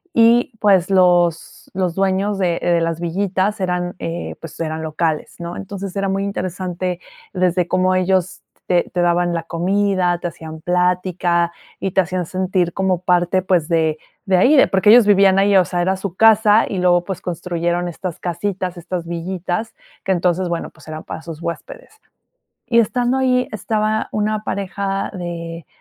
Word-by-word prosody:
Y, 235 +1 +4
pues, 195 -3 +3
los 175 -3 +2
los 180 -3 0
dueños 195 +1 0
de 175 -2 0
de 170 -1 +2
las 165 0 -1
villitas 190 +3 -1
eran, 180 0 -2
eh, 165 +1 -5
pues, 165 0 -10
eran 160 -1 -3
locales, 155 0 -2
¿no? 170 +1 -6
Entonces, 195 -1 -7
era 195 -1 -1
muy 195 +1 -1
interesante 185 -2 -3 0.3
desde 180 -1 +1
cómo 185 0 +2
ellos 185 0 0 0.3
te 175 -1 +1
te 175 - 0
daban 175 0 +2
la 165 - -2
comida, 185 +1 0
te 175 - -3
hacían 160 -1 -10
plática 180 -1 +1 0.3
y 195 - -2
te 190 - +3
hacían 180 -1 -3
sentir 185 -1 -1
como 190 -2 +1
parte, 180 +1 +2
pues, 175 -4 +1
de 160 -2 +1 0.3
de 190 -2 +3
ahí, 270 +10 +5
porque 195 +2 +3
ellos 235 -1 +8
vivían 195 -1 +5
ahí, 200 0 +4
o 180 - +4
sea, 175 -1 -2
era 190 +2 0
su 190 -2 -5
casa 220 0 +5
y 195 - -4
luego, 175 -1 +3
pues, 190 -3 -4
construyeron 175 0 -2
estas 175 0 -6
casitas, 180 0 -3
estas 175 0 -5
villitas 180 +5 -4 0.3
que 190 - +2
entonces, 180 +1 0
bueno, 170 -1 -3
pues, 155 - -19
eran 155 0 -6
para - - -7
sus 165 -1 -8
huéspedes. 435 - -7 0.7
Y 235 -1 +4
estando 245 +3 0
ahí 250 -1 +1
estaba 215 +1 -1
una 215 0 -1
pareja 195 0 -3
de 170 -2 -6
180 Hz, 165 wpm, -19 LUFS, 175-195 Hz, 0.7 s, ellos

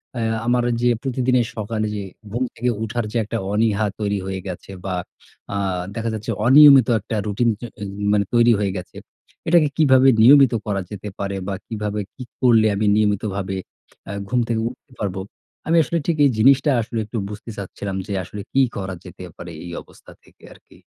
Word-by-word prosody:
অ্যা 115 -1 -1
আমার 120 0 +2 0.2
যে 120 - +3
প্রতিদিনের 125 -2 +1
সকালে 110 0 -2
যে 100 - -4 0.3
ঘুম 120 +4 -1
থেকে 125 +2 -1
উঠার 115 +1 -2
যে 120 - -1
একটা 110 +2 -4 0.2
অনীহা 110 0 +2
তৈরি 100 -1 -1
হয়ে 95 -1 -4
গেছে, 90 +1 -7
বা 95 -2 -2 0.6
আ - - 0 0.4
দেখা 115 0 -2
যাচ্ছে 110 -1 -4 0.2
অনিয়মিত 140 -2 +8
একটা 105 +2 -5
রুটিন 110 +4 +1
চ - - -32 0.2
অ - - -3 0.3
মানে 100 -1 +2
তৈরি 120 0 +5
হয়ে 100 -2 -1
গেছে। 90 -2 -9 0.5
এটাকে 165 -2 +5
কিভাবে 135 -4 +5 0.2
নিয়মিত 135 0 +7
করা 100 -2 -1
যেতে 105 0 -6
পারে? 100 0 -3
বা 100 - -2
কিভাবে 105 -1 -3 0.2
কি 130 - -8 0.2
করলে 115 -4 +5
আমি 105 +2 0
নিয়মিতভাবে 100 -2 0 0.5
অ্যা 100 - -6 0.2
ঘুম 125 - +1
থেকে 115 -1 0
উঠতে 130 +2 -16
পারব। 100 -3 -2 0.5
আমি 165 +1 +3
আসলে 170 +5 -2
ঠিক 165 -2 +1
এই - - +5
জিনিসটা 135 +5 +5
আসলে 115 +1 -4
একটু 110 +3 -6
বুঝতে 105 +2 -9
চাচ্ছিলাম 100 0 -5
যে 100 - -3
আসলে 100 +4 -8
কি 135 - +4
করা 95 -1 -4
যেতে 90 0 -10
পারে? 85 0 -8
এই 85 - -7
অবস্থা - - -17
থেকে - - -25
আরকি। - - -21
110 Hz, 185 wpm, -21 LUFS, 100-125 Hz, 0.6 s, অনিয়মিত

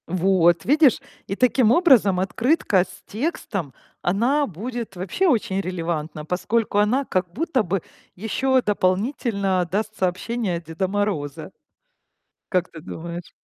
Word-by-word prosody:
Вот 175 -2 +3
видишь. 290 -2 +4 0.3
И 195 - -3
таким 250 -1 +3
образом, 245 - +5
открытка 210 - +2
с - - -14
текстом, 210 - -3 0.3
она 245 +11 +1
будет 225 +3 -6
вообще 190 - 0
очень 225 - +1
релевантна, 165 -4 -4
поскольку 205 +5 0
она 245 +7 +2
как 185 -5 -1
будто 280 - 0
бы 190 0 -1 0.3
ещё 260 +6 +1
дополнительно 200 -2 0
даст 215 +2 -2
сообщение 185 +2 -1
от 170 - -10
Деда 165 +4 -2
Мороза. 180 -7 -2 1.0
Как 180 -2 0
ты 165 - -10
думаешь? 170 +2 -7
195 Hz, 125 wpm, -23 LUFS, 180-235 Hz, 1.0 s, образом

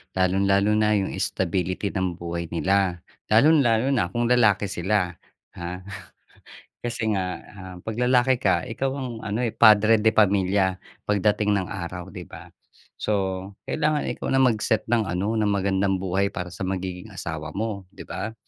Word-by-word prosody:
Lalong-lalo 100 +2 +2
na 105 0 +3
'yong 100 -2 0
stability 95 +2 -1
ng 95 -3 -2
buhay 85 0 -5
nila. 95 0 +1 0.3
Lalong-lalo 125 0 +4
na 115 -10 +1
kung 120 +6 -1
lalaki 105 -5 +3
sila, 90 0 0 0.5
ha. 85 +1 -4 1.1
Kasi 115 -2 -2
nga, 90 -2 -2 0.2
um, 95 -2 -9
'pag 110 -1 -3
lalaki 125 +1 +3
ka 95 +2 +2
ikaw 130 +3 -2
ang 130 -2 -4
ano 110 +3 -1
eh, 115 - -4
padre 110 0 +6
de 110 - +5
pamilya 95 -2 +2 0.3
pagdating 105 0 +2
ng 95 -3 -1
araw, 90 -2 -6
'di - - -9
ba? - - -12 0.5
So 95 -1 -2
kailangan 150 -3 0
ikaw 120 - -5
na 135 - +4
mag-set 110 -2 +2
ng 115 -3 +2
ano 100 +5 -1
ng 105 - +2
magandang 95 -1 +1
buhay 95 +2 0
para 90 0 -4
sa 95 +2 -5
magiging 95 +2 -5
asawa 80 -3 -5
mo, 100 -3 -3
'di - - -9
ba? 110 +1 -5
100 Hz, 155 wpm, -24 LUFS, 95-110 Hz, 1.1 s, padre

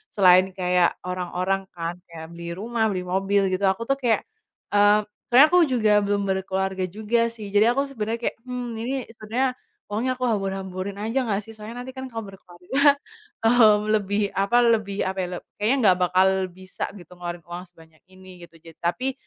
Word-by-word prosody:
selain 185 -1 +6
kayak 180 -1 +2
orang-orang 180 +1 -2
kan 170 0 -4 0.2
kayak 160 -1 -8
beli 170 0 -7
rumah, 225 +2 -1
beli 185 -1 -3
mobil 195 +2 +1
gitu, 185 +2 -2
aku 190 +4 0
tuh 275 - +2
kayak 235 -4 +1 0.5
eee, 205 +1 +5 0.3
sebenarnya 265 +5 +8
aku 360 - +6
juga 220 -5 +3
belum 200 0 0
berkeluarga 190 0 -1
juga 220 +4 0
sih. 215 -3 -9
Jadi 205 +1 +5
aku 275 +3 +1
sebenarnya 230 -3 -3
kayak, - - -27
"Hmm, 250 -1 -4
ini 260 +3 -2
sebenarnya 245 +4 -2 0.4
uangnya 255 +4 -1
aku 255 - -1
hambur-hamburin 195 -2 -3
aja 225 +6 -1
nggak 200 +1 0
sih? 225 - -11
Soalnya 225 +3 -8
nanti 260 - -8
kan 260 -1 -7
kalo 225 -2 -6
berkeluarga, 195 - +1 0.5
hmm, 220 -3 +6
lebih 205 0 0
apa 200 +5 +2
lebih 215 -4 +1
apa 190 +1 -3
ya, - - -3
leb - - -11 0.2
kayaknya 235 +6 +3
nggak 180 - +4
bakal 185 +2 +4 0.2
bisa 185 +1 -6
gitu, 175 -1 -15
ngeluarin 175 -1 -6
uang 175 +1 -7
sebanyak 160 -2 -20
ini," 185 -1 -14
gitu. 165 - -20
Jad 165 -1 -14
tapi, 255 +10 -1
200 Hz, 180 wpm, -24 LUFS, 185-230 Hz, 0.5 s, sebenarnya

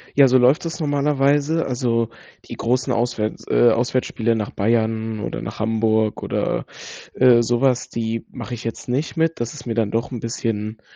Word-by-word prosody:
Ja, 140 -1 +7
so 130 0 +5
läuft 130 +6 +4
das 165 +1 -4
normalerweise. 145 +1 +1
Also, 120 -3 0 0.4
die - - -8
großen 125 +1 0
Auswärts 115 -2 -1
äh, 120 - +5
Auswärtsspiele 115 -1 0
nach 105 -2 -2
Bayern 110 0 0
oder - - -4
nach - - -7
Hamburg 110 -1 +1
oder, - - -1 0.5
äh, 125 -2 +5
so 120 +1 0
was, 130 -3 +2
die 115 0 -3
mache 125 0 -7
ich 120 -1 -6
jetzt 115 - -5
nicht 135 +6 -1
mit. 165 0 0
Das 120 0 -3
ist 150 - -10
mir 115 - -2
dann 110 -3 0
doch 115 +3 -1
'n 120 - -4
bisschen, 110 -1 -3
120 Hz, 180 wpm, -21 LUFS, 115-130 Hz, 0.5 s, Ja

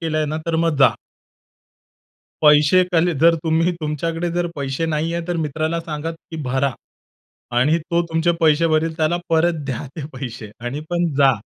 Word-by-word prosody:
केला 160 -2 -1
आहे 155 - 0
ना? 155 +1 -3
तर 165 - 0
मग 165 -3 +1
जा. 135 - +6 1.5
पैसे 150 +4 +6
कले 175 0 +2
जर 165 0 +6
तुम्ही 165 +2 +2
तुमच्याकडे 165 +3 -2
जर 175 0 0
पैसे 140 +3 -2
नाही 160 +1 -1
आहे, 170 0 -3
तर 175 - -1
मित्राला 155 +2 -1
सांगा 160 -1 -4
की 165 0 -11
भरा. 130 +1 0 0.9
आणि 150 +6 +3
तो 170 +1 -1
तुमचे 165 +1 +1
पैसे 160 0 +4
भरेल. 160 +1 +1
त्याला 160 +2 +1
परत 165 -1 +2
द्या 135 +1 -4
ते 145 - -5
पैसे 120 -4 -7
आणि 120 +5 -4
पण 175 0 +1
जा. 135 -1 +6
160 Hz, 175 wpm, -20 LUFS, 150-165 Hz, 1.5 s, जा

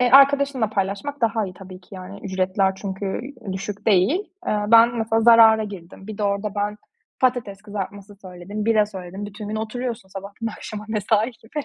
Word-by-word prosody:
E, 250 -1 +3
arkadaşınla 275 -4 +5
paylaşmak 200 +9 -2
daha 225 -2 +1
iyi 185 - -9
tabii 185 0 -11
ki, 190 - -15
yani. 185 +2 -9
Ücretler 190 0 +1
çünkü 195 +1 -4 0.3
düşük 195 +3 -6
değil. 215 - +4 0.3
Eee, 210 -1 0
ben 230 +1 +6
mesela 225 0 +1
zarara 225 -1 +7
girdim. 190 -1 -10
Bir 215 -1 -7
de - - -2
orada 200 +1 -1
ben 205 +1 -1 0.4
patates 240 -6 0
kızartması 205 -1 -6
söyledim, 185 +3 -6
bira 215 -2 +4
söyledim. 190 0 -7
Bütün 210 +1 -8
gün 215 - -3
oturuyorsun, 225 -2 -4
sabahtan 200 +4 -7
akşama, 215 -1 -6
mesai 220 +2 +1
gibi. 230 +6 -7
210 Hz, 170 wpm, -23 LUFS, 195-225 Hz, 0.4 s, zarara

